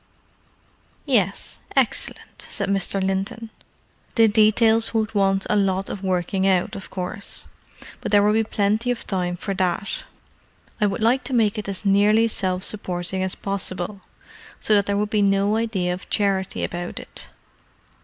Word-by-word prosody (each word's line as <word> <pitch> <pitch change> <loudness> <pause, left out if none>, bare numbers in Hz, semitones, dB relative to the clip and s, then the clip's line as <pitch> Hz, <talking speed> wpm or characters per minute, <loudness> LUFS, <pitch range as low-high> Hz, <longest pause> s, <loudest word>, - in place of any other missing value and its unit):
"Yes—excellent," 205 -9 -1
said 200 -1 -3
Mr. 195 0 +1
Linton. 195 +4 -2 0.6
"The 225 -1 +6
details 220 +1 +4
would 220 -1 0
want 195 -1 +2
a - - +1
lot 195 -1 +1
of 195 - -6
working 190 0 0
out, 185 -2 +2
of 195 -3 -8
course: 185 +2 -5 0.5
but - - -5
there 205 -1 +6
will 210 +1 +4
be 225 +1 +3
plenty 215 +2 0
of 245 -1 -1
time 180 -2 -1
for 195 +3 -4
that. 185 +1 -1 0.8
I 210 - +5
would 205 +3 -2
like 250 +4 +3
to 270 - -4
make 220 -2 +2
it 205 - -5
as 195 +1 -5
nearly 205 +3 +4
self 185 -4 -1
supporting 185 -3 -2
as 190 0 -1
possible, 195 0 -3 0.6
so 215 - +1
that 200 -1 +3
there 200 0 +1
would 210 +1 -1
be 210 - +2
no 200 +1 +3
idea 210 -6 0
of 180 - -8
charity 195 -2 0
about 175 0 -4
it." - - -5
200 Hz, 155 wpm, -23 LUFS, 190-215 Hz, 0.8 s, The